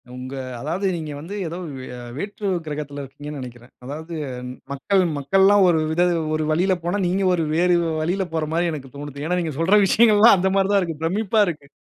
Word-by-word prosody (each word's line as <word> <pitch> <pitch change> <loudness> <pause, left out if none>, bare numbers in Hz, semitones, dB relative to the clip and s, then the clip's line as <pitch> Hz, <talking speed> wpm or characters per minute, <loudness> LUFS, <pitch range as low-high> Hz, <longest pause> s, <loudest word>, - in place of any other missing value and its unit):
உங்க 130 +1 -7 0.3
அதாவது 170 +9 -3
நீங்க 155 -2 -5
வந்து 180 +7 -7
ஏதோ 170 +2 -5 0.2
வே 130 - -8 0.3
வேற்று 205 +2 -4 0.2
கிரகத்துல 145 -1 -5
இருக்கீங்கன்னு 145 +2 -8
நெனைக்குற. 120 -2 -9 0.2
அதாவது 160 +5 -7 0.6
மக்கள் 190 +8 +1 0.2
மக்கள்லாம் 195 +7 +4
ஒரு 160 -2 +3
வித 175 +2 +2 0.3
ஒரு 155 - -1
வழில 185 +4 +2
போனா, 180 +4 -1
நீங்க 190 +2 0
ஒரு 165 -2 +1
வேறு 175 +1 +3 0.3
வழியில 185 +4 0
போற 160 -1 0
மாரி 170 +1 +1
எனக்கு 135 -4 -8
தோனுது. 145 0 -7
ஏன்னா, 180 +2 0
நீங்க 160 -3 -3
சொல்ற 190 +6 +4
விஷயங்கள்லாம் 215 0 +6
அந்த 190 +1 +1
மாதிரி 195 0 +2
தான் 200 -1 +4
இருக்கு. 165 -3 -4
பிரமிப்பா 210 +5 +1
இருக்கு. 150 -4 -5
170 Hz, 185 wpm, -22 LUFS, 145-195 Hz, 0.6 s, விஷயங்கள்லாம்